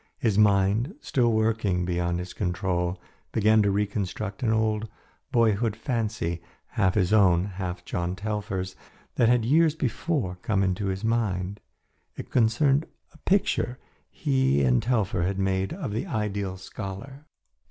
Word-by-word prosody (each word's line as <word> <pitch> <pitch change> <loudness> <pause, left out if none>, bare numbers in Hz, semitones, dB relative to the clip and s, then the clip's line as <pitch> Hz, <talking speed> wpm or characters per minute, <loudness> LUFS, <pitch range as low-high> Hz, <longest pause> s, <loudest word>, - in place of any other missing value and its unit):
His 110 -4 +1
mind, 105 - +3
still 120 - +1
working 110 -5 +1
beyond 85 -1 -1
his 90 +1 -6
control, 90 -1 -1 0.3
began 110 0 +4
to 100 - +2
reconstruct 100 0 -2
an 115 -3 +1
old 110 0 0 0.4
boyhood 115 -3 +2
fancy, 110 - -2 0.3
half 95 -6 +1
his 95 -1 +2
own, 95 -4 +5
half 95 -2 -5
John 90 +1 -2
Telfer's, 100 -2 -3 0.4
that 115 - +3
had 120 -2 +3
years 155 +4 +4
before 130 - -2
come 100 -3 +1
into 95 +2 0
his 95 +1 -3
mind. 100 -4 -1 0.6
It - - -8
concerned 135 +6 +3 0.3
a - - -19
picture 190 -10 +1 0.3
he 65 +1 +1
and 65 -2 +3
Telfer 110 -6 0
had 95 +2 -1
made 95 0 0
of 165 - -4
the 115 - -2
ideal 100 - -2
scholar. 110 +10 -8
105 Hz, 140 wpm, -26 LUFS, 95-115 Hz, 0.6 s, own